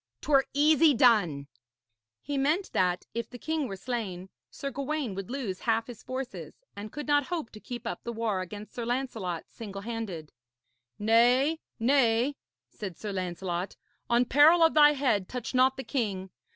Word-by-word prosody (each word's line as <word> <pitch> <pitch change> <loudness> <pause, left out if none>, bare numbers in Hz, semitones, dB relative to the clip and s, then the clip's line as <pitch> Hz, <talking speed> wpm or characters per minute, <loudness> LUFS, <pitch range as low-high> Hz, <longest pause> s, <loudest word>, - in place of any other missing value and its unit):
'Twere 275 -2 +3
easy 300 0 +5
done.' 190 - +4 0.8
He 285 - -3
meant 300 +8 +1
that, 180 -1 +1
if 230 -1 -4
the 245 - -9
king 315 +1 -2
were 195 - -5
slain, 195 -4 -4 0.2
Sir 275 - -5
Gawaine 280 -2 -3
would 195 +2 -6
lose 240 -8 -4
half 225 -1 +1
his 240 -2 -10
forces, 255 0 -6 0.2
and 205 +1 -7
could 295 - -6
not 290 -2 +2
hope 335 -9 -4
to 215 - -11
keep 240 +1 -7
up 230 - -4
the 235 - -4
war 220 -4 -1
against 205 +3 -8
Sir 240 - -4
Lancelot 230 -8 -3
singlehanded. 200 -6 -6 0.7
'Nay, 245 +8 +4 0.2
nay,' 245 +1 +3 0.4
said 190 -5 -7
Sir 210 - -5
Lancelot, 180 -1 -3 0.3
'on 240 +1 +4
peril 305 +7 +6
of 325 - +5
thy 295 -1 +7
head 245 -9 0
touch 250 +1 -5
not 260 +1 +4
the 265 - -4
king. 200 -9 -2
235 Hz, 165 wpm, -28 LUFS, 200-275 Hz, 0.8 s, thy